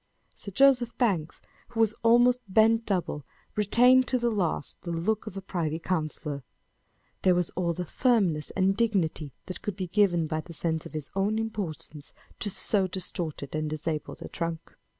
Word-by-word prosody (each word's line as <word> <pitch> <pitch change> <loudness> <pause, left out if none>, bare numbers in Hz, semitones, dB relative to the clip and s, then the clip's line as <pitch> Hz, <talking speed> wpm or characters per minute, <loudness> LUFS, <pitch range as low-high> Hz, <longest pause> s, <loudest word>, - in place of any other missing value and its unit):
Sir - - -8
Joseph 250 +2 +4
Banks, 185 - 0 0.3
who 235 -1 -7
was 220 -1 +4
almost 240 +2 +5
bent 225 +3 +4
double, 180 -7 -1 0.3
retained 250 +5 +5
to 255 - +2
the 240 -1 0
last 175 -9 -2
the 175 - -7
look 205 +7 -1
of 200 -2 -6
a 195 - -6
privy 165 -5 -2
councillor. 155 -4 -3 0.8
There 185 -1 +4
was 175 -1 0
all 170 -1 -1
the 180 +2 -4
firmness 190 - +1
and 195 0 +3
dignity 190 -10 0
that 185 - -7
could 210 - -3
be 190 -2 -3
given 175 -3 +2
by 155 0 -2
the 170 - -11
sense 160 -1 -2
of - - -16
his 155 -2 -5
own 200 +3 +1
importance 180 -9 -5 0.2
to 205 - -2
so 195 0 +1
distorted 170 -6 -4
and 155 0 -1
disabled 155 0 -4
a - - -6
trunk. 165 -1 -5
185 Hz, 170 wpm, -28 LUFS, 160-220 Hz, 0.8 s, almost